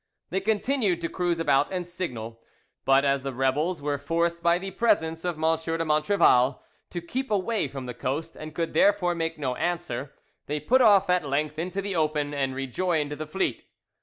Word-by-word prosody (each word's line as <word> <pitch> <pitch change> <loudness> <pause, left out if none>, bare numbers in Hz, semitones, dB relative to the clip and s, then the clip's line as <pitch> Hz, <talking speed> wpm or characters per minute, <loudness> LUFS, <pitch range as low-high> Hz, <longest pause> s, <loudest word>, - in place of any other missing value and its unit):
They 190 - +1
continued 215 -2 +1
to 165 - -2
cruise 175 -2 -1
about 145 -2 +2
and 180 -2 -2
signal, 120 -11 -5 0.4
but 135 +2 +4
as 140 -1 +2
the 135 -1 -5
rebels 145 +5 0
were 145 -1 -1
forced 170 +3 0
by 170 0 +4
the 190 +2 -6
presence 165 -7 +1
of 175 -2 -1
M. 155 - -10
de 165 +1 0
Montrevel 150 -4 +3 0.3
to 175 - -5
keep 260 +10 -4
away 205 -2 0
from 135 -1 -7
the 125 - -5
coast, 135 +6 -3
and 155 0 -9
could 165 -1 -2
therefore 195 -3 +3
make 165 -1 -3
no 135 -4 -1
answer, 165 -6 -3 0.3
they 150 +1 -2
put 260 - +3
off 205 -4 +6
at 180 -6 +1
length 150 +2 -1
into 185 +3 -3
the 200 -1 -3
open, 150 -2 0
and 135 -2 -1
rejoined 150 +3 -1
the 150 +1 -5
fleet. 190 +5 -2
165 Hz, 190 wpm, -26 LUFS, 145-180 Hz, 0.4 s, off